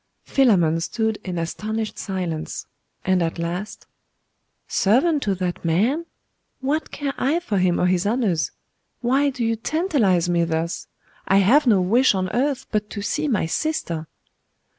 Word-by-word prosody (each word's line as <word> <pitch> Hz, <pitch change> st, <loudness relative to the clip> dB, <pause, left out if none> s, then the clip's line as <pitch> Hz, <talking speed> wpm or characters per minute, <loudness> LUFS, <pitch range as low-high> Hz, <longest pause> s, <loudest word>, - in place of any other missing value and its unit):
Philammon 180 Hz, -, +3 dB
stood 220 Hz, +5 st, -1 dB
in 180 Hz, -2 st, -4 dB
astonished 215 Hz, +6 st, -3 dB
silence; 175 Hz, -5 st, -4 dB, 0.4 s
and 185 Hz, -1 st, +2 dB
at 165 Hz, 0 st, -1 dB
last 175 Hz, +5 st, -4 dB, 0.8 s
'Servant 275 Hz, -, +2 dB
to 200 Hz, -5 st, 0 dB
that 180 Hz, -1 st, -3 dB
man? 225 Hz, -, +1 dB, 0.5 s
What 290 Hz, +4 st, -1 dB
care 280 Hz, -2 st, -3 dB
I 295 Hz, +6 st, +2 dB
for 210 Hz, -, -1 dB
him 180 Hz, -1 st, +2 dB
or -, -, +2 dB
his 180 Hz, +1 st, +2 dB
honours? 210 Hz, -8 st, +1 dB, 0.5 s
Why 270 Hz, +4 st, +2 dB
do 255 Hz, -4 st, -3 dB
you 230 Hz, 0 st, +1 dB
tantalise 225 Hz, -, +1 dB
me 170 Hz, -1 st, +2 dB
thus? 165 Hz, +1 st, -2 dB, 0.4 s
I 195 Hz, -, +4 dB
have 250 Hz, +9 st, +5 dB
no 205 Hz, -5 st, +5 dB
wish 230 Hz, +5 st, +4 dB
on 185 Hz, -1 st, -1 dB
earth 270 Hz, +2 st, 0 dB
but 210 Hz, -1 st, -1 dB
to 205 Hz, -, -5 dB
see 305 Hz, +8 st, -1 dB
my 225 Hz, -, +1 dB
sister! 165 Hz, -, -2 dB
210 Hz, 150 wpm, -23 LUFS, 175-265 Hz, 0.8 s, have